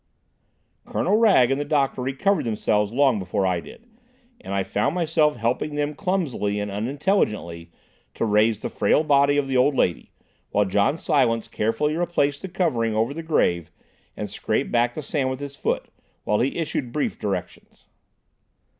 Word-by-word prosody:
Colonel - - 0
Wragge 195 - +5
and 135 +2 0
the - - 0
doctor 140 -3 0
recovered 135 +11 0
themselves 105 -2 0
long 130 -3 +3
before 95 +1 -1
I 90 -2 +1
did, 230 - -13 0.6
and - - -7
I 100 0 0
found 105 - -1
myself 160 -3 +2
helping 120 +6 -1
them 145 0 -1
clumsily 150 - -1
and 105 0 -3
unintelligently 105 - -1 0.4
to - - -1
raise 105 +1 +3
the - - -5
frail 155 - +2
body 145 -1 +3
of 145 - +1
the 130 -1 0
old 135 +3 +3
lady, 90 -8 0 0.4
while 105 0 +2
John 100 - +1
Silence 125 -9 +1
carefully 115 +8 -1
replaced 160 -4 0
the 190 - -5
covering 135 - 0
over 115 +5 0
the 165 - -5
grave 85 - +1 0.5
and - - -3
scraped - - -2
back 120 0 +1
the 155 - -5
sand 135 -2 -1
with 130 0 -4
his 140 -1 -7
foot, - - -2 0.4
while 105 - +1
he 130 - 0
issued 145 -6 -3
brief 150 - -2
directions. 95 -4 -5
130 Hz, 165 wpm, -23 LUFS, 105-150 Hz, 0.6 s, Wragge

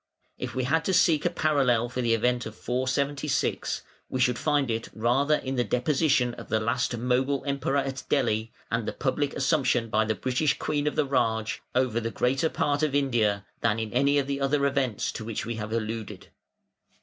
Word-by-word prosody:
If - - -5
we 130 - 0
had 160 +6 +1
to 190 - +2
seek 160 -2 +4
a - - +4
parallel 140 -8 +2
for 125 +1 -3
the 115 -1 +3
event 120 +1 0
of 110 - -9
476, 135 +4 -1 0.3
we 130 - -2
should 125 -1 +2
find 145 -5 +1
it 115 0 -3
rather 130 +7 +2
in 135 -2 -3
the 120 - +3
deposition 125 +1 +1
of - - -10
the 110 - +2
last 115 +2 0
Mogul 130 +3 0
Emperor 140 0 0
at 135 -1 -2
Delhi, 115 -5 +1 0.2
and 115 -1 -1
the - - -2
public 140 +1 -1
assumption 130 -5 +1
by 110 0 +3
the 110 0 0
British 130 +6 0
Queen 150 -1 -1
of 150 - -1
the - - +2
"Raj" 110 -5 0
over 125 -3 +2
the 115 0 -2
greater 135 +7 +1
part 145 -1 0
of 150 -3 +1
India, 115 -8 +1
than 115 -1 +1
in 110 -1 -4
any 140 +3 +3
of 140 - +2
the 140 0 -3
other 140 +1 +2
events 135 -5 0
to 115 - -6
which 115 +1 -4
we 115 0 -4
have 105 0 -5
alluded. 110 -1 -4
130 Hz, 195 wpm, -27 LUFS, 115-140 Hz, 0.3 s, seek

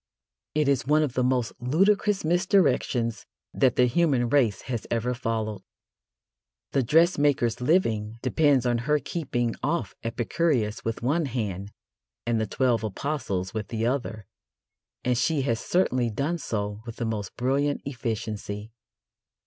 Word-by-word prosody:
It 150 -2 +2
is 130 -3 +1
one 155 +1 +4
of 140 -5 -2
the 125 - +1
most 125 -2 +1
ludicrous 195 - +2
misdirections 165 - +1 0.3
that 130 -3 +3
the 125 - +5
human 125 -3 +2
race 115 -9 +2
has 120 -4 -4
ever 120 +2 0
followed. 110 -3 -3 1.1
The 135 - +2
dressmaker's 145 -4 +3
living 115 - +1
depends 135 -1 +3
on 120 -1 +2
her 150 +5 +2
keeping 125 -7 -2
off 170 +2 -1
Epicurus 120 0 0
with 115 0 -3
one 150 +5 +1
hand 105 -6 -3 0.5
and 115 -1 +1
the 110 - -1
Twelve 120 -1 +1
Apostles 105 -5 -3
with 110 -2 -3
the 115 -1 -2
other, 120 -5 -2 0.8
and 125 0 +2
she 140 +4 +1
has 115 -4 0
certainly 130 -9 +1
done 145 +10 -2
so 105 -4 -3
with 115 - -6
the 120 - -3
most 105 -3 -4
brilliant 140 +3 +1
efficiency. 110 -4 -4
125 Hz, 140 wpm, -26 LUFS, 115-145 Hz, 1.1 s, the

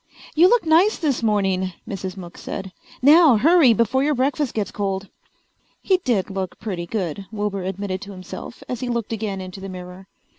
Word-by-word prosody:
"You 345 +4 +6
look 475 -5 +3
nice 335 +7 +4
this 285 -7 0
morning," 190 -4 +1
Mrs. 190 -1 -5
Mook 175 -2 -9
said. 190 -1 -6 0.3
"Now 300 -1 +7
hurry 310 +1 +6
before 230 +4 +2
your 295 0 +2
breakfast 275 +1 0
gets 210 -2 -1
cold." 195 -1 -3 0.7
He 375 - +3
did 235 - -1
look 190 -2 -4
pretty 185 -5 -5
good, 190 -1 -3
Wilbur 205 -2 -2
admitted 190 0 -4
to 200 - -8
himself 185 +5 -9
as 250 - -4
he 250 -1 -3
looked 235 -2 -2
again 205 -3 -3
into 185 +1 -8
the 195 - -6
mirror. 180 +1 -9
205 Hz, 180 wpm, -22 LUFS, 190-260 Hz, 0.7 s, Now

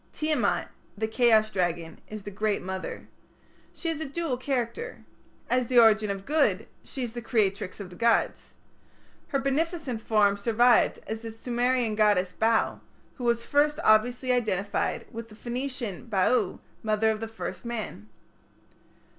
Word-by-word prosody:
Tiamat, 310 0 0 0.3
the 220 +1 -1
chaos 220 -2 +4
dragon, 170 -4 -2
is 215 -1 -7
the 205 - -7
Great 210 0 -1
Mother. 190 0 -5 0.6
She 340 - -6
has 320 -2 -2
a - - -1
dual 290 -1 -2
character. 255 - -3 0.4
As 250 -1 +1
the 250 - +1
origin 220 -2 +6
of 195 -1 -4
good 250 -10 +2 0.2
she 265 - -5
is 235 -2 -4
the 240 - -5
creatrix 205 -4 0
of 190 -3 -8
the - - -11
gods. 230 +3 +1 0.7
Her 275 - 0
beneficent 275 -2 -1
form 205 -3 +3
survived 235 +3 +4
as 220 0 -5
the 225 -1 -6
Sumerian 240 0 0
goddess 205 -4 +3
Bau, 225 0 +1 0.4
who 245 - -5
was 235 0 +1
obviously 255 -4 +3
identical 215 -5 0
with 230 0 -7
the 215 - -13
Phoenician 245 -3 -5
Baau, 215 +3 +1 0.2
mother 220 0 +2
of 215 - -3
the 225 - -4
first 225 0 -6
man. 220 - -5
225 Hz, 145 wpm, -27 LUFS, 210-250 Hz, 0.7 s, origin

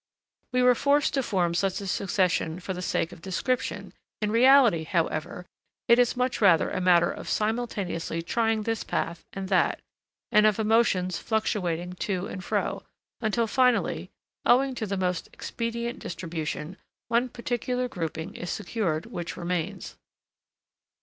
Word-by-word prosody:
We 250 0 +2
were 250 0 +7
forced 285 +3 +2
to 270 - +2
form 180 -8 0
such 190 +2 0
a 200 - -6
succession 180 -3 0
for 190 +1 -4
the 180 - -5
sake 170 -1 -1
of 165 - -12
description; 245 +8 -2 0.3
in 210 -1 -1
reality, 235 - +6
however, 165 0 -2 0.4
it 235 +1 +6
is 245 0 +3
much 250 -1 0
rather 180 -6 +5
a - - -2
matter 175 -2 +4
of - - -7
simultaneously 210 -7 -2
trying 225 +3 0
this 225 +1 -2
path 165 0 -3
and 195 -1 -5
that, 185 -2 +2 0.5
and 210 0 +6
of 210 - +2
emotions 215 -5 +2
fluctuating 180 -6 -1
to 190 -2 -1
and 185 - -7
fro, - - -1 0.4
until 230 +1 +1
finally, 250 +2 +1 0.3
owing 265 +2 +4
to 220 -3 -4
the 195 0 -2
most 180 -2 -1
expedient 235 +2 -4
distribution, 165 0 -5 0.3
one 240 +2 +1
particular 245 +1 -2
grouping 165 -3 -5
is 175 - -6
secured 180 -6 -2
which 175 -7 -6
remains. 180 +2 -3
200 Hz, 145 wpm, -27 LUFS, 175-235 Hz, 0.5 s, were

